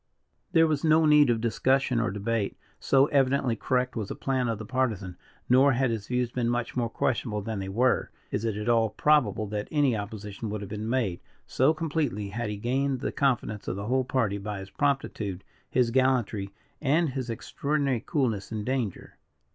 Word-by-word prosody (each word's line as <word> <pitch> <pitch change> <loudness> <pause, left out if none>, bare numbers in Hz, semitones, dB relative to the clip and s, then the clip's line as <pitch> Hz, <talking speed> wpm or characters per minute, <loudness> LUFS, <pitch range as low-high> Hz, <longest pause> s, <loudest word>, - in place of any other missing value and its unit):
There 165 -2 +6
was 155 -3 0
no 160 0 +5
need 150 -2 +6
of 115 -2 +1
discussion 130 +2 +1
or 115 - +1
debate, 105 +1 -2 0.2
so 135 0 +4
evidently 135 -3 +2
correct 125 +2 0
was 110 -4 -3
the - - -4
plan 130 -2 -1
of 115 - -1
the 110 - -7
Partisan; 110 -7 -1 0.3
nor, 130 +3 +5
had 125 0 +1
his 110 -3 -4
views 125 -1 0
been 120 -2 -1
much 120 -1 -2
more 120 -2 0
questionable 110 -3 -1
than 110 -1 -3
they 95 0 -4
were, 125 +6 +2 0.2
is 105 - -2
it 110 -3 -1
at 105 +1 -4
all 115 -2 +3
probable 120 -4 +2
that 105 0 -3
any 145 -5 +2
opposition 105 +1 -6
would 105 0 -4
have 100 -1 -8
been 110 +1 -4
made, 115 -9 0 0.3
so 135 +4 +3
completely 150 -10 -2
had 115 +2 -3
he 105 - -4
gained 130 +4 -1
the - - -2
confidence 120 -6 0
of - - -2
the 100 +1 -5
whole 130 +3 +1
party, 115 -6 0
by 105 0 -4
his 95 0 -9
promptitude, 110 -9 -1 0.3
his 120 -2 +2
gallantry, 125 -6 +1 0.3
and 155 +3 +2
his 130 -2 -4
extraordinary 140 +2 -1
coolness 115 - -1
in 110 -2 -3
danger. 125 -5 -3
120 Hz, 190 wpm, -27 LUFS, 105-135 Hz, 0.3 s, There